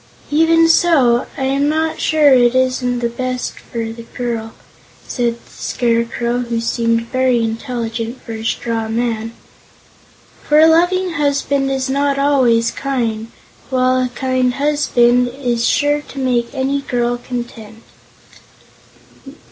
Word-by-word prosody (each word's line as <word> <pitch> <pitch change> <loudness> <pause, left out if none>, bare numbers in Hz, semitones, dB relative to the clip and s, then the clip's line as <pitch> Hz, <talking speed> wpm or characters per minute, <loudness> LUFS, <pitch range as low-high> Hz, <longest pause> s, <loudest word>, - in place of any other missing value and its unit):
"Even 330 +2 +4
so, 285 -8 +3
I 270 - -3
am 275 +2 +1
not 315 +1 -1
sure 300 -3 +4
it 245 -1 +4
isn't 250 -2 0
best 255 -1 -3
for 230 -2 -5
the 230 - -10 0.2
girl," 230 -2 -3 0.5
said 240 -2 -1
the 235 - -22
Scarecrow, 235 0 -1
who 235 -2 -2
seemed 230 0 0
very 255 -2 +2
intelligent 230 +1 -4
for 230 - -8
a 220 0 -6
straw 225 0 -2
man, 225 -1 -2 1.1
"for 300 - +2
a 315 - +7
loving 355 +3 +3
husband 280 -3 0
is 265 -1 -1
not 280 +1 0
always 255 -5 +2
kind, 230 -5 -2 0.4
while 255 0 +2
a 250 - -1
kind 255 0 -1
husband 250 -4 +2
is 245 -2 -1
sure 290 0 +2
to 290 - -14
make 245 -3 0
any 275 +1 -1
girl 245 -2 -1
content." 235 -3 -7
250 Hz, 130 wpm, -17 LUFS, 235-280 Hz, 1.1 s, a